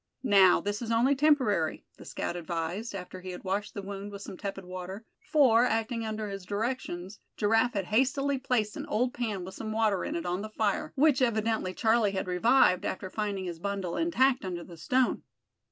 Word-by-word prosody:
"Now, 195 -6 +6
this 205 +2 -3
is 230 - -4
only 240 +5 +3
temporary," 260 - +2
the - - -12
scout 175 - -4
advised, 175 +6 -4
after 185 0 -7
he 185 - -7
had 180 - -7
washed 195 +2 -2
the 200 - -5
wound 200 +1 -6
with 200 0 -8
some - - -8
tepid 195 -1 -6
water, 185 +4 -7 0.3
for, 250 -6 +6
acting 225 0 0
under 215 0 -3
his 195 -1 -6
directions, 205 -2 -4 0.2
Giraffe 225 +3 +2
had 195 -2 -1
hastily 270 +6 +1
placed 240 -5 0
an - - -6
old 245 +4 0
pan 210 -7 -3
with 190 - -8
some 220 +2 -5
water 215 -3 +1
in 310 - -3
it, 335 - -3
on 180 +2 -1
the 215 - -6
fire, 215 -2 -1
which 285 -1 +4
evidently 220 -5 0
Charlie 220 -2 +2
had 190 - -2
revived 180 0 +4
after 190 -1 -4
finding 205 -3 -2
his 170 -2 -5
bundle 195 -2 -3
intact 270 -6 +2
under 175 -2 -4
the 170 - -11
stone. 255 +10 +1
210 Hz, 195 wpm, -29 LUFS, 185-240 Hz, 0.3 s, Now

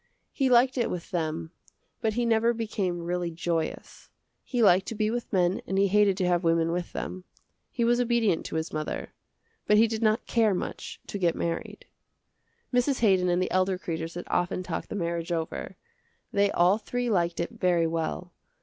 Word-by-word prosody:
He 270 -2 +1
liked 255 +1 +4
it 235 - +1
with 175 -2 -5
them 160 -1 -2 0.5
but 220 -1 +1
he 240 +2 0
never 230 +1 +3
became 195 -6 -2
really 175 0 -2
joyous. 165 -1 -4 0.3
He 245 -3 0
liked 190 -1 +5
to 225 - -4
be 215 0 0
with 240 0 -4
men 180 -1 +2
and 190 - -1
he 200 0 +3
hated 205 -1 +4
to 185 - 0
have 175 0 +2
women 165 0 +2
with 175 0 -3
them. 185 0 -5 0.5
He 235 - -2
was 240 +1 +3
obedient 235 -7 +2
to - - -6
his 160 0 -2
mother, 155 0 -4 0.5
but 210 - +5
he 225 - +7
did 220 0 -3
not 220 +1 +2
care 220 -4 +2
much - - -5
to 200 - -5
get 170 -3 +2
married. 170 0 -4 0.9
Mrs. 250 +2 +2
Haydon 190 -5 +4
and 175 0 +2
the - - -3
elder 185 0 +2
Kreders 165 -2 -5
had 175 - -5
often 175 +1 -1
talked - - -5
the - - -5
marriage 170 -2 -2
over. 165 -1 -3 0.6
They 200 0 +3
all 185 +3 +3
three 245 +1 -2
liked 170 -3 +1
it 170 - -2
very 175 -2 +3
well. 165 +2 -3
185 Hz, 190 wpm, -27 LUFS, 170-220 Hz, 0.9 s, he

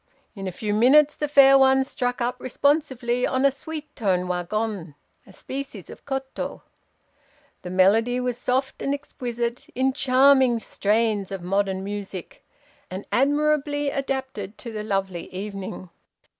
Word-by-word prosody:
"In 195 -2 -5
a - - -2
few 210 +3 -3
minutes 280 +7 +5
the 295 - -2
fair 275 -1 +7
one 265 0 +5
struck 250 -2 -3
up 240 +1 -1
responsively 255 -3 +1
on 260 +1 +1
a 275 - +5
sweet 305 +1 -8
toned 185 -4 0
wagon 180 -2 -3 0.3
(a - - -14
species 260 -2 -7
of - - -13
koto). 270 -1 -4 1.0
"The 180 - -7
melody 215 +7 +3
was 250 -1 -1
soft 260 +2 -1
and 275 - 0
exquisite, 240 -4 -4
in 265 +1 +1
charming 265 -2 +4
strains 215 -2 0
of 190 -3 -5
modern 190 +1 0
music, 200 -2 -7 0.5
and 185 +2 -6
admirably 290 +1 +1
adapted 265 -7 -4
to 235 - -8
the 215 -1 -5
lovely 195 -4 -3
evening. 190 -2 -6
245 Hz, 140 wpm, -24 LUFS, 200-270 Hz, 1.0 s, fair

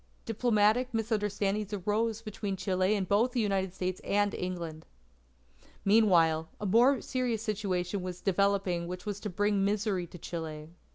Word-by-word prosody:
Diplomatic 230 +1 +2
misunderstandings 210 -2 -1
arose 215 +3 -1
between 205 -2 -4
Chile 185 +2 +1
and 195 -3 -1
both 225 +6 +2
the 250 - 0
United 195 -3 0
States 185 -1 -3
and 205 0 +1
England. 170 -3 -5 1.0
Meanwhile, 170 -7 +4
a 210 - -4
more 240 +7 +4
serious 245 -4 -2
situation 195 -3 -2
was 180 -1 -5
developing 195 -3 +1
which 180 0 -6
was 205 -1 -3
to 210 - -4
bring 205 +1 +1
misery 200 -3 0
to 175 - -11
Chile. 155 -2 -6
200 Hz, 145 wpm, -30 LUFS, 180-215 Hz, 1.0 s, Meanwhile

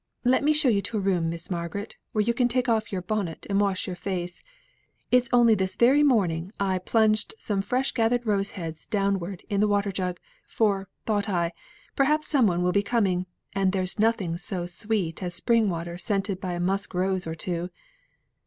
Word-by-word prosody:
Let 255 +2 +3
me 300 - +4
show 300 -2 +3
you 210 -5 +3
to 220 - -3
a - - +1
room, 180 -4 +1
Miss 170 +2 -6
Margaret, 175 +4 -4 0.2
where 215 - +1
you 235 +3 +1
can 245 0 +2
take 250 +1 0
off 225 -2 +1
your 185 -3 -3
bonnet, 195 -4 -3
and 200 +1 +3
wash 195 -2 0
your 185 - -4
face. 180 -1 -4 0.7
It's 250 -1 +4
only 240 -2 +6
this 190 -2 -1
very 265 +5 +5
morning 190 - +2
I 190 -2 +1
plunged 215 +3 +2
some 205 -3 -1
fresh 255 +6 0
gathered 240 0 +1
roses 200 -2 0
head 165 -3 -6
downward 195 -3 -1
in 200 -2 -1
the 210 - +4
water 205 -1 +1
jug, 180 -2 -3 0.3
for 200 -3 0 0.2
thought 210 -1 0
I, 170 -2 0 0.4
perhaps 300 +2 +2
some 265 -7 +4
one 175 -1 +1
will 180 - +2
be 200 - +3
coming, 195 -5 0 0.3
and 195 -1 +1
there's 185 +1 -1
nothing 200 -7 +1
so 180 -2 -3
sweet 180 -1 -2
as 175 -1 -3
spring 230 -3 +2
water 170 0 -4
scented 195 0 -1
by 180 -1 -3
a 175 - -3
musk 195 +2 -1
rose 185 -1 0
or 160 - -3
two. 175 +1 -2
195 Hz, 200 wpm, -26 LUFS, 180-225 Hz, 0.7 s, only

